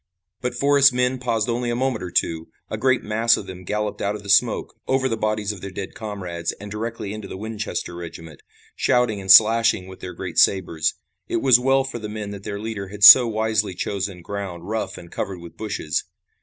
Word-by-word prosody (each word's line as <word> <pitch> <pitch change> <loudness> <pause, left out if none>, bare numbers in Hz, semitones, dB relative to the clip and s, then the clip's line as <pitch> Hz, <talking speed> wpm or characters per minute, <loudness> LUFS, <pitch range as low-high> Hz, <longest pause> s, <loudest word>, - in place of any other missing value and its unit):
But 125 -1 -3
Forrest's 140 +1 +5
men 125 +1 0
paused 115 -3 -1
only 120 0 -1
a 120 - -1
moment 125 -2 -1
or 90 - -5
two. 80 -1 -1 0.2
A - - -2
great 130 -1 +2
mass 115 +2 +2
of - - -7
them 95 -1 -9
galloped 105 +2 -3
out 100 +1 -1
of 105 - -9
the 100 - -10
smoke, - - +2
over 130 0 +1
the 115 - -1
bodies 110 -1 -1
of 100 -3 -10
their 100 - -6
dead 95 0 -7
comrades 90 -6 -5
and 105 0 -11
directly 110 -1 -5
into 110 -1 -7
the - - -8
Winchester 110 -3 -5
regiment, 80 -3 -10 0.3
shouting 120 -5 +1
and 95 0 +2
slashing 110 -2 +6
with 95 0 -12
their 90 - -8
great - - -3
sabers. 85 -5 +2 0.3
It - - -1
was 130 -3 +6
well 135 +1 +2
for 135 -3 -6
the 105 -1 -6
men 105 -1 -6
that 100 -1 -8
their 100 -1 -5
leader 105 -2 -5
had 105 +1 -7
so 120 +3 +11
wisely 110 -3 -1
chosen 95 -1 -4
ground 95 -3 -6
rough 105 -2 -3
and 85 -1 -12
covered 95 -2 -4
with 85 -1 -12
bushes. 105 -8 -3
105 Hz, 210 wpm, -22 LUFS, 95-115 Hz, 0.3 s, so